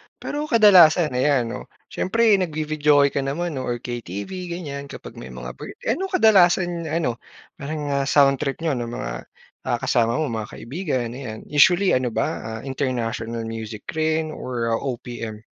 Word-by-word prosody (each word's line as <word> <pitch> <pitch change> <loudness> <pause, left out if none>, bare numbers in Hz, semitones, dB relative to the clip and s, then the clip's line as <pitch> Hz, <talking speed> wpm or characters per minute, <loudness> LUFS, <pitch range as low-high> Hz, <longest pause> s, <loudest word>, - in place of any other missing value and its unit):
Pero 295 +1 -4
kadalasan 180 - +6
ayan, 125 -2 +1
'no, - - -7 0.2
siyempre 220 0 +3
nag-vi-videoke 150 -4 +2
ka - - -1
naman 140 +2 -2
or 120 -2 -3
KTV 110 - -5 0.2
ganyan, 145 -5 -6
kapag - - -10
may 65 - -8
mga 60 0 -7
birth - - -8
eh - - +1
ano 385 +2 -1
kadalasan 175 - +3
ano, 155 -8 -1 0.4
parang 145 0 -4
ah, 140 0 0
sound 140 -2 +4
trip 145 +2 -3
n'yo 160 - +1
nung 120 0 -4
mga - - -5 0.4
ah, - - +1
kasama 115 0 +2
mo, 155 -6 -1
mga 110 -2 -4
kaibigan, 130 -2 -3
ayan. 120 -4 -7
Usually 175 +6 +5
ano 125 -3 0
ba 110 - +1 0.2
ah, 110 0 -6
international 120 -4 -3
music 110 -1 -6
rin 155 0 0
or 120 -5 -3
OPM? 115 -3 -4
140 Hz, 160 wpm, -23 LUFS, 115-165 Hz, 0.4 s, kadalasan